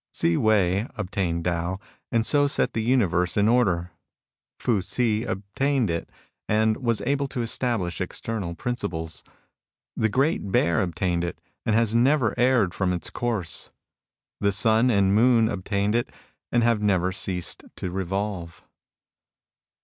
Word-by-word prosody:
Hsi 85 - +2
Wei 100 -1 +2
^ - - -22
obtained 90 -4 -2
Tao, 90 +2 -1 0.3
and 115 -1 +2
so 145 +2 +3
set 140 - 0
the 110 - -1
uni 120 0 +3
verse 90 +1 0
in 105 +1 +4
order. 90 -8 +2 0.7
Fu 110 -6 +1
Hsi 110 +3 0
' - - -7
obtained 115 +3 0
it, 85 - -3 0.4
and 110 +1 +2
was 115 -4 0
able 140 +1 0
to 125 -2 -3
establish 115 -7 -1
eternal 100 -7 -4
principles. 90 -8 -4 0.7
The 110 - +1
Great 135 - 0
Bear 85 -3 +2
obtained 90 -1 -1
it, 85 - -4 0.3
and 110 - +3
has 115 -1 +2
never 125 0 +3
erred 120 -7 +3
from 90 0 0
its 90 - -4
course. 110 -9 -3 0.7
The 100 0 +2
sun 110 +4 +3
and 100 -4 +3
moon 115 +1 +4
obtained 100 0 -1
it, 120 +1 0 0.4
and 120 -1 +3
have 115 -2 +2
never 95 -3 +2
ceased 90 -1 -2
to 90 - -4
revolve. 95 -1 -3
105 Hz, 150 wpm, -25 LUFS, 90-115 Hz, 0.7 s, in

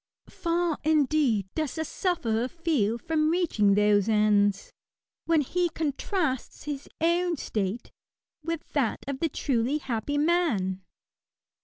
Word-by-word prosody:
Far, 340 -2 -1
indeed, 290 - +2
does 310 -4 -2
the 320 -1 -2
sufferer 250 - -1
feel 275 - 0
from 310 +4 0
reaching 295 - +2
those 205 0 +3
ends, 205 -2 +2 0.5
when 330 -2 +3
he 350 +5 0
contrasts 310 - -2
his 285 -1 -5
own 340 +1 +1
state 210 -1 -3 0.5
with 330 0 -4
that 255 -7 0
of 280 -1 -3
the 330 - 0
truly 260 0 0
happy 265 0 -3
man. 290 - +1
290 Hz, 120 wpm, -27 LUFS, 220-330 Hz, 0.5 s, those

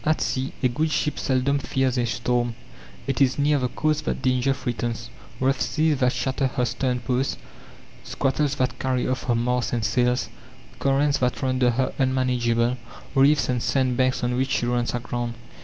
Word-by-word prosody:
At 155 +1 +2
sea 130 +1 -1
a - - +6
good 150 +6 0
ship 150 -1 -1
seldom 135 +1 +1
fears 130 -2 0
a 120 -2 +1
storm. 120 0 0 0.5
It 135 +1 -1
is 130 -1 +3
near 145 0 +3
the 125 - 0
coasts 155 +4 0
that - - -3
danger 130 +1 +2
threatens 120 -3 -3 0.3
rough 135 +1 +1
seas 155 -2 +1
that 125 -1 +3
shatter 130 +2 -1
her 125 -1 -1
stern 125 +1 -1
post, 125 +3 -1 0.7
squalls 135 +1 0
that 125 -1 -1
carry 130 -1 0
off 130 +1 -2
her 120 - +2
masts 125 +1 0
and 115 -3 0
sails, 125 +1 +1 0.5
currents 140 +1 +2
that 125 0 -1
render 130 -1 +2
her 130 +2 0
unmanageable, 125 -2 +1 0.4
reefs 145 +2 +4
and 125 -2 0
sand 130 -1 +1
banks 130 0 +1
on 125 0 0
which 130 +1 0
she 120 - 0
runs 120 0 0
aground. 120 -1 -3
130 Hz, 175 wpm, -24 LUFS, 120-135 Hz, 0.7 s, a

